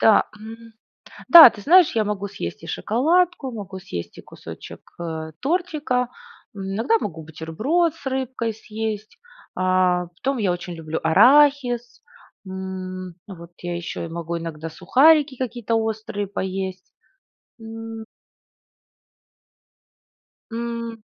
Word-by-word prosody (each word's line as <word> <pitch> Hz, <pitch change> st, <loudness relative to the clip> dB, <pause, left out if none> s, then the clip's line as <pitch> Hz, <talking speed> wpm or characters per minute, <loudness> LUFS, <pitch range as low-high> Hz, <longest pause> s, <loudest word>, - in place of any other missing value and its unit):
Да, 220 Hz, -, +5 dB
м. 225 Hz, +1 st, -11 dB, 0.6 s
Да, 335 Hz, -7 st, +12 dB
ты 210 Hz, -, -12 dB
знаешь, 350 Hz, -, +6 dB
я 220 Hz, -, +3 dB
могу 205 Hz, -1 st, -3 dB
съесть 85 Hz, -, -7 dB
и -, -, -9 dB
шоколадку, 315 Hz, -, +1 dB
могу 200 Hz, -4 st, -7 dB
съесть 90 Hz, -, -7 dB
и -, -, -9 dB
кусочек, -, -, -11 dB, 0.2 s
э, 160 Hz, -1 st, -5 dB
тортика, 295 Hz, -5 st, -1 dB, 0.5 s
м, 200 Hz, -, -7 dB
иногда 235 Hz, -, +2 dB
могу 165 Hz, -, -5 dB
бутерброд 215 Hz, -, -1 dB
с 325 Hz, -, -18 dB
рыбкой 260 Hz, -4 st, -2 dB
съесть, 215 Hz, -1 st, -6 dB, 0.4 s
а 185 Hz, -1 st, +2 dB
потом 260 Hz, +11 st, -3 dB
я 205 Hz, -6 st, +1 dB
очень 175 Hz, 0 st, -5 dB
люблю 160 Hz, -1 st, -4 dB
арахис, 245 Hz, -, +4 dB, 0.4 s
м, 185 Hz, -1 st, -6 dB
вот 170 Hz, -4 st, -11 dB
я 175 Hz, 0 st, -3 dB
еще 170 Hz, 0 st, -5 dB
и -, -, -8 dB
могу 170 Hz, 0 st, -4 dB
иногда 165 Hz, -1 st, -6 dB
сухарики 275 Hz, -, +4 dB
какие-то 240 Hz, -3 st, -2 dB
острые 220 Hz, -2 st, -2 dB
поесть. 190 Hz, -1 st, -5 dB, 0.7 s
М 225 Hz, 0 st, -8 dB, 2.5 s
М. 230 Hz, -1 st, -5 dB
215 Hz, 120 wpm, -22 LUFS, 180-250 Hz, 2.5 s, Да